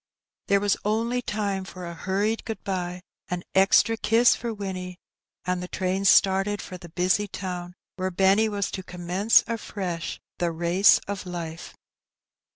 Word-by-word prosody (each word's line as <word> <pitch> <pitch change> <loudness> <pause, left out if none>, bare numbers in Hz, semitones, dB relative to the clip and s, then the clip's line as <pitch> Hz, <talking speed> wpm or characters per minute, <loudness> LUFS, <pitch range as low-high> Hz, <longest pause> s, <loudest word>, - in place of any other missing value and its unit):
There 200 - +4
was 205 0 +1
only 230 +4 0
time 205 -4 -2
for 185 -1 -9
a 170 - -6
hurried 200 +6 -1
good 225 - -6
bye, 180 -2 -3 0.3
an 180 0 -3
€xtra 200 +3 +4
kiss 235 +2 +5
for 235 0 -4
Winnie, 185 -4 -5 0.5
and 180 -1 -1
the 180 - -5
train 190 +1 -2
started 195 +2 +4
for 185 -2 -8
the 175 -1 -11
busy 185 +5 +1
town 180 -2 -6 0.2
where 185 0 -1
Benny 195 +4 +3
was 200 -1 -2
to 190 - -4
commence 180 +4 +2
afresh 190 -7 -4 0.2
the 175 -1 +1
race 175 +4 +4
of 200 -2 -5
life. 165 -2 -6
190 Hz, 155 wpm, -25 LUFS, 180-205 Hz, 0.5 s, kiss